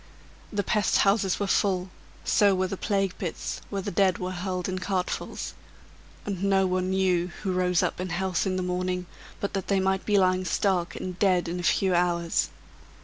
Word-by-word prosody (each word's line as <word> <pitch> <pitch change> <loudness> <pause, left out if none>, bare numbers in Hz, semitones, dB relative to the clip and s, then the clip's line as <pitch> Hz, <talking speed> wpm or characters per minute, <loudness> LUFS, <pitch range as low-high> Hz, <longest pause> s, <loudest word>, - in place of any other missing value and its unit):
The 205 -1 0
pest 210 +2 +2
houses 195 -2 +2
were 200 - 0
full, 190 -2 +1 0.3
so 200 -2 +4
were 185 0 +1
the 185 - -3
plague 195 -1 0
pits, 175 -4 -4
where 195 -2 -3
the - - -3
dead 190 0 +3
were 185 0 -3
hurled 185 0 -3
in 185 -1 -2
cartfuls; 185 -1 -3 0.7
and 195 -2 -3
no 195 -1 +3
one 185 0 0
knew 185 -2 +2 0.2
who 190 -2 0
rose 180 -1 +2
up - - -1
in 185 - -3
health 185 +1 0
in 185 - 0
the 185 - -1
morning 180 0 -1 0.3
but 200 - -3
that 195 -2 -3
they 195 -1 +2
might 190 0 +1
be 205 -1 +2
lying 185 -1 +3
stark 185 -2 0
and 185 -1 -5
dead 185 -3 +3
in 175 +2 -3
a - - -2
few 185 +2 +2
hours. 175 -1 +1
185 Hz, 195 wpm, -27 LUFS, 180-195 Hz, 0.7 s, so